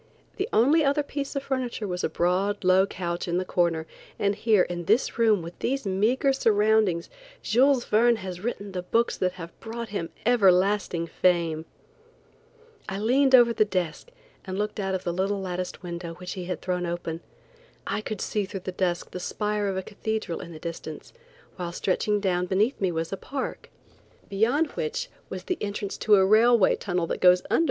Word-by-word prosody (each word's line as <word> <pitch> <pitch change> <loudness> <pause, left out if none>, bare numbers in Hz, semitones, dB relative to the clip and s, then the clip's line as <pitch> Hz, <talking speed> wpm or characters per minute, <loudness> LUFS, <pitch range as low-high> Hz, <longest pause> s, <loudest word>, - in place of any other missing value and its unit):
The 390 +3 -2
only 295 +8 +4
other 285 +1 +2
piece 285 -1 -5
of 275 - -2
furniture 255 -6 -3
was 180 -1 -3
a - - +1
broad, 190 +4 0
low 185 +1 +5
couch 175 -2 -4
in 175 0 0
the 185 - -1
corner, 170 -3 +1 0.3
and 200 0 +1
here 215 -2 +3
in 175 -1 -5
this 225 +5 +1
room 215 -6 +4
with 170 +1 -9
these 270 -1 -1
meagre 220 +8 +2
surroundings, 215 -7 +2 0.4
Jules 255 +2 +3
Verne 235 +2 +4
has 190 -4 -6
written 205 -3 -4
the 185 -1 -3
books 230 +6 +1
that 180 -1 0
have 170 -2 -10
brought 230 +1 -6
him 180 -5 -3 0.2
everlasting 195 -5 +3
fame. 170 -2 +1 1.2
I 195 - -3
leaned 260 +5 +4
over 240 -2 +6
the 215 - +4
desk 185 - -3 0.3
and 190 -1 -5
looked 210 +1 -2
out 190 -1 -1
of 185 - -4
the 175 - -2
little 195 +3 0
latticed 180 -1 -4
window 170 -1 -6
which 180 0 -8
he 185 -2 -5
had 180 -2 -5
thrown 180 -1 -1
open. 170 -1 -4 0.6
I - - -2
could 215 -2 -5
see 210 -2 -1
through 195 -1 -6
the 185 - -5
dusk 180 -2 -2
the 180 - -5
spire 210 +2 -2
of 190 -1 -2
a 190 - -2
cathedral 220 -3 -3
in 170 - -8
the 160 - -9
distance, 160 -1 -7 0.4
while 175 -2 -4
stretching 205 +4 0
down 180 -2 0
beneath 205 +8 +1
me 190 -2 +2
was 165 +2 -3
a - - -2
park, 270 +5 -5 0.6
beyond 245 +10 +1
which 480 0 -3 0.2
I - - -3
saw - - -9
the 365 - -2
entrance 200 -1 -3
to 210 - +5
a 190 -1 +5
railway 220 0 +5
tunnel 180 -3 -2
that - - -4
goes 180 0 +6
under - - +4
M. - - +2
195 Hz, 195 wpm, -26 LUFS, 180-225 Hz, 1.2 s, over